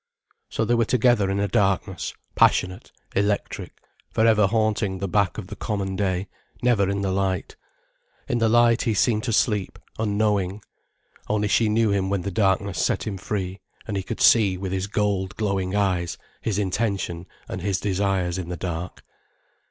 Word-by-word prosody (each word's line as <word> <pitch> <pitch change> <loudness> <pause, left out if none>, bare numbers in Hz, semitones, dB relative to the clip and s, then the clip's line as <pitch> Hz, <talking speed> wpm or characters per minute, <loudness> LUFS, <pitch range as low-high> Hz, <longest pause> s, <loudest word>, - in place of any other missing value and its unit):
So 110 - -1
they 120 - +1
were 115 -1 +3
together 115 -4 +3
in 100 0 0
a 100 - +1
darkness, 95 -1 0 0.2
passionate, 90 0 +2 0.2
electric, 100 +1 -1 0.3
for 110 - +2
ever 110 -3 +5
haunting 110 -3 0
the 100 +1 -3
back 100 0 +1
of 105 - -5
the 105 +3 -8
common 100 -3 -3
day, 95 -1 -1 0.4
never 110 -6 +3
in 100 0 -1
the 95 - 0
light. 95 -1 -1 0.7
In 120 - 0
the 115 -1 +3
light, 120 0 +4
he 110 - 0
seemed 110 +1 +2
to 120 - -1
sleep, 105 -3 +1 0.2
unknowing. 105 -2 0 0.7
Only 105 -1 +1
she 110 +2 +3
knew 110 0 +2
him 95 -1 0
when 100 -2 0
the 100 - -3
darkness 95 -2 +1
set - - 0
him 100 -3 -3
free, 95 -1 -3 0.3
and 105 - -3
he 95 - 0
could - - -5
see 100 -5 +5
with 95 0 -4
his 95 +1 -1
gold 100 -3 -1
glowing 100 -3 -1
eyes 90 -4 0 0.2
his 105 -3 -1
intention 95 -3 -1 0.2
and 95 - -5
his 95 0 0
desires 95 -2 0
in 85 -2 -5
the 90 - -4
dark. 85 +1 -5
100 Hz, 175 wpm, -24 LUFS, 95-105 Hz, 0.7 s, ever